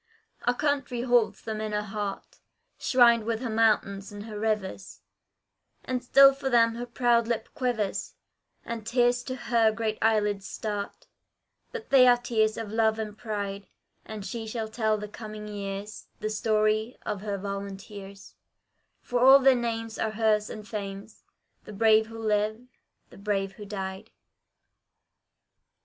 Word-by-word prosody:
Our 245 Hz, -, +2 dB
Country 275 Hz, -4 st, -1 dB
holds 240 Hz, -3 st, +2 dB
them 215 Hz, -1 st, -4 dB
in 215 Hz, -1 st, -3 dB
her 210 Hz, 0 st, 0 dB
heart, 205 Hz, -1 st, -5 dB, 0.4 s
Shrined 235 Hz, -3 st, +5 dB
with 225 Hz, 0 st, -2 dB
her 245 Hz, -3 st, -3 dB
mountains 210 Hz, -3 st, +1 dB
and 205 Hz, 0 st, -8 dB
her 215 Hz, -2 st, -7 dB
rivers; 210 Hz, -3 st, -3 dB, 0.8 s
And 255 Hz, -1 st, -2 dB
still 275 Hz, +2 st, +7 dB
for 270 Hz, 0 st, -3 dB
them 230 Hz, -2 st, +4 dB
her 240 Hz, +1 st, -6 dB
proud 235 Hz, -1 st, +2 dB
lip 230 Hz, -2 st, -2 dB
quivers, 235 Hz, -6 st, -2 dB, 0.5 s
And 230 Hz, -1 st, -5 dB
tears 245 Hz, +1 st, +2 dB
to 255 Hz, +1 st, -5 dB
her 230 Hz, -3 st, +2 dB
great 220 Hz, -1 st, -3 dB
eyelids 210 Hz, -3 st, +1 dB
start: 205 Hz, -2 st, -5 dB, 0.7 s
But 470 Hz, -2 st, -8 dB
they 260 Hz, -2 st, +7 dB
are 245 Hz, 0 st, +6 dB
tears 220 Hz, -3 st, 0 dB
of 220 Hz, -2 st, -5 dB
love 220 Hz, 0 st, +2 dB
and 215 Hz, -1 st, -5 dB
pride, 205 Hz, -3 st, -5 dB, 0.4 s
And 215 Hz, -2 st, -8 dB
she 225 Hz, 0 st, -5 dB
shall 220 Hz, -1 st, -4 dB
tell 220 Hz, -1 st, 0 dB
to 210 Hz, -, -6 dB
coming 215 Hz, 0 st, -8 dB
years 200 Hz, 0 st, -6 dB
The 215 Hz, 0 st, -3 dB
story 215 Hz, +1 st, +1 dB
of 200 Hz, -, -3 dB
her 205 Hz, -1 st, -3 dB
Volunteers, 200 Hz, 0 st, -7 dB, 0.7 s
For 245 Hz, -, -1 dB
all 265 Hz, +2 st, +9 dB
their 270 Hz, -1 st, +5 dB
names 225 Hz, -2 st, -3 dB
are 220 Hz, -, 0 dB
hers 215 Hz, -1 st, +1 dB
and 215 Hz, -1 st, -8 dB
fame's 200 Hz, -1 st, -7 dB, 0.4 s
The 210 Hz, -, -9 dB
brave 220 Hz, +1 st, +4 dB
who 225 Hz, 0 st, -10 dB
live, 215 Hz, 0 st, 0 dB, 0.5 s
the -, -, -14 dB
brave 195 Hz, -1 st, -1 dB
who 205 Hz, +2 st, -11 dB
died. 190 Hz, -2 st, -6 dB
220 Hz, 150 wpm, -27 LUFS, 210-235 Hz, 0.8 s, all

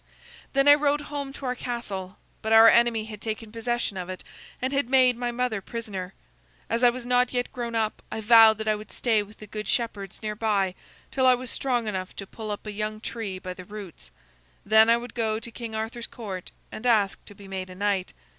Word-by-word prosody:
"Then 275 Hz, +1 st, +3 dB
I 290 Hz, -, +11 dB
rode 290 Hz, 0 st, +2 dB
home 280 Hz, -2 st, -3 dB
to 275 Hz, -, -8 dB
our 250 Hz, -, 0 dB
castle, 205 Hz, -7 st, -5 dB, 0.2 s
but 220 Hz, -, -3 dB
our 225 Hz, 0 st, +9 dB
enemy 235 Hz, -1 st, +4 dB
had 215 Hz, -1 st, -9 dB
taken 220 Hz, 0 st, -4 dB
possession 230 Hz, -2 st, -2 dB
of 180 Hz, 0 st, -5 dB
it, 185 Hz, -, -6 dB, 0.4 s
and 260 Hz, +2 st, -2 dB
had 275 Hz, -3 st, 0 dB
made 255 Hz, -2 st, +5 dB
my 240 Hz, 0 st, -2 dB
mother 240 Hz, -4 st, -1 dB
prisoner. 195 Hz, -5 st, -6 dB, 0.6 s
As 230 Hz, +2 st, 0 dB
I 245 Hz, -, +8 dB
was 240 Hz, 0 st, -5 dB
not 250 Hz, 0 st, +2 dB
yet 245 Hz, 0 st, -1 dB
grown 235 Hz, -2 st, -4 dB
up 220 Hz, -1 st, -1 dB
I -, -, -3 dB
vowed 220 Hz, 0 st, +7 dB
that 220 Hz, 0 st, -5 dB
I 215 Hz, -, +4 dB
would 215 Hz, 0 st, -7 dB
stay 225 Hz, -4 st, +2 dB
with 205 Hz, +1 st, -11 dB
the 215 Hz, -, -10 dB
good 210 Hz, 0 st, -6 dB
shepherds 210 Hz, -4 st, -2 dB
near 210 Hz, -1 st, -2 dB
by 205 Hz, -4 st, +1 dB, 0.4 s
till 260 Hz, -1 st, +2 dB
I 255 Hz, -, +7 dB
was 250 Hz, -1 st, -5 dB
strong 245 Hz, -4 st, 0 dB
enough 185 Hz, -3 st, -4 dB
to 195 Hz, -, -6 dB
pull 215 Hz, +2 st, -8 dB
up 205 Hz, +1 st, -5 dB
a 210 Hz, -, -4 dB
young 215 Hz, +1 st, -3 dB
tree 215 Hz, -4 st, -4 dB
by 185 Hz, 0 st, -6 dB
the 185 Hz, -, -10 dB
roots. 195 Hz, -, -10 dB, 0.6 s
Then 220 Hz, +2 st, +6 dB
I 230 Hz, -, +6 dB
would 240 Hz, -1 st, -8 dB
go 220 Hz, -2 st, 0 dB
to 235 Hz, -, -8 dB
King 230 Hz, -1 st, -6 dB
Arthur's 225 Hz, +2 st, -4 dB
Court 195 Hz, -6 st, -7 dB, 0.2 s
and 235 Hz, -, -4 dB
ask 210 Hz, -5 st, +2 dB
to 205 Hz, -, -12 dB
be 200 Hz, 0 st, -13 dB
made 190 Hz, -1 st, -5 dB
a 185 Hz, -, -10 dB
knight. 195 Hz, -1 st, 0 dB
220 Hz, 225 wpm, -26 LUFS, 205-240 Hz, 0.6 s, I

